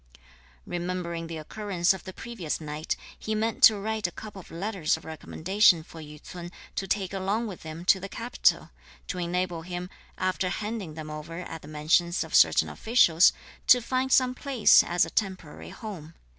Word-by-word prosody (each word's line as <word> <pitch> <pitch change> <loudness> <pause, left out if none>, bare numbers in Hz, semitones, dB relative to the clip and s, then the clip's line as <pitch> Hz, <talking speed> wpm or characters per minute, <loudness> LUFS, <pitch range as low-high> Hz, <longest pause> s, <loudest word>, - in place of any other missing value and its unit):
Remembering 175 -1 -3
the 165 -1 -6
occurrence 185 +2 0
of 190 - -9
the 185 - -6
previous 190 -6 -5
night, 155 0 -3 0.2
he 215 - -2
meant 220 +1 -1
to 215 - +6
write 215 0 -2
a - - -8
couple 210 +2 -9
of 185 - -13
letters 185 -2 -1
of 160 - -15
recommendation 165 +2 +2
for 160 0 -11
Yü 150 0 -11
ts'un 175 +2 -9 0.2
to 195 - -3
take 190 -2 -1
along 195 +4 -1
with 200 -5 -7
him 160 +2 -8
to 190 - +5
the 195 +2 -7
capital, 235 +4 0 0.3
to 180 - -4
enable 175 -1 -1
him, 180 +1 -6 0.3
after 185 0 0
handing 210 -5 -4
them 155 -1 -7
over 160 +3 -7
at 165 -3 -7
the - - -12
mansions 160 +4 +1
of - - -11
certain - - +5
officials, 190 -8 +4 0.4
to 250 - +8
find 255 +2 -1
some 255 -1 +4
place 255 -4 +5
as 175 0 +2
a 165 - -9
temporary 185 -7 -3
home. 175 -8 -9
180 Hz, 180 wpm, -27 LUFS, 165-210 Hz, 0.4 s, to